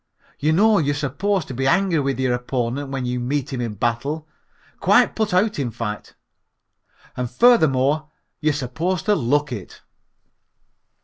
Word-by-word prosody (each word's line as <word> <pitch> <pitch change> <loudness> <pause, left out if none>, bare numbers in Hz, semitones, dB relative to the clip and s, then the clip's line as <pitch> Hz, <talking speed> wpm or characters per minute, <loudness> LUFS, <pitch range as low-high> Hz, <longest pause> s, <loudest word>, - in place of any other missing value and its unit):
Y'know 195 +9 +4
you're 145 -2 0
supposed 160 +6 -1
to - - -6
be 135 +2 -1
angry 180 +2 +2
with 135 -2 -1
your 130 -1 +1
opponent 125 +2 -2
when 135 -2 -3
you 125 0 -2
meet 135 +3 -2
him 125 - -2
in 115 -3 -3
battle, 140 +9 -2 0.5
quite - - +4
put 220 -2 0
out 195 +1 +1
in 130 -4 -1
fact. 105 -2 -6 1.0
And 125 -1 -3
furthermore 155 - +3 0.3
you're 155 -2 +2
supposed 160 +7 -2
to 210 - +3
look 145 - +1
it." 105 -7 -8
140 Hz, 145 wpm, -22 LUFS, 125-160 Hz, 1.0 s, Y'know